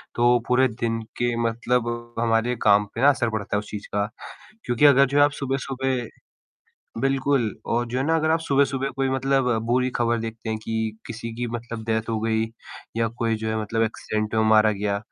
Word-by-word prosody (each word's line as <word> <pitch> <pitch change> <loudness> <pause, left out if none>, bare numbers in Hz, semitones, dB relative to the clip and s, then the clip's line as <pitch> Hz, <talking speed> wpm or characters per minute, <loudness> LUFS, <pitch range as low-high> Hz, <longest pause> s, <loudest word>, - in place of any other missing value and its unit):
तो 120 +1 +4
पूरे 130 +1 +4
दिन 115 -1 -2 0.2
के 120 0 0
मतलब 120 0 -2
हमारे 115 +1 +1
काम 105 0 +5
पे 115 - -3
ना 140 - +7
असर 125 -4 +1
पड़ता 110 -2 -3
है - - +1
उस 105 - -9
चीज़ 105 -1 -6
का, 100 0 0 0.6
क्योंकि 120 +3 +2
अगर 140 -1 +7
जो 145 - +6
आप 145 - +3
सुबह-सुबह 135 -2 -2 0.9
बिल्कुल 135 -1 +1 0.3
और 120 +1 +1
जो 125 +2 -2
है 130 - 0
ना 165 +1 +3
अगर 160 0 +1
आप 165 +1 +2
सुबह-सुबह 140 -3 +1
कोई 135 0 +1
मतलब 135 0 +1 0.2
बुरी 125 +2 +2
खबर 120 0 +1
देखते 115 0 -6
हैं 110 - -2
कि 110 -1 -2
किसी 115 +1 -6
की 120 +1 -3
मतलब 115 -1 -6
डेथ 110 0 -1
हो 110 - 0
गई 110 0 +1 0.5
या 115 0 +2
कोई 115 -2 +1
जो 110 0 -4
है 110 0 -1
मतलब 115 +2 -1
एक्सीडेंट 110 -1 -2
में 110 - +3
मारा 110 0 +5
गया, 100 0 -1
120 Hz, 200 wpm, -24 LUFS, 110-130 Hz, 0.9 s, ना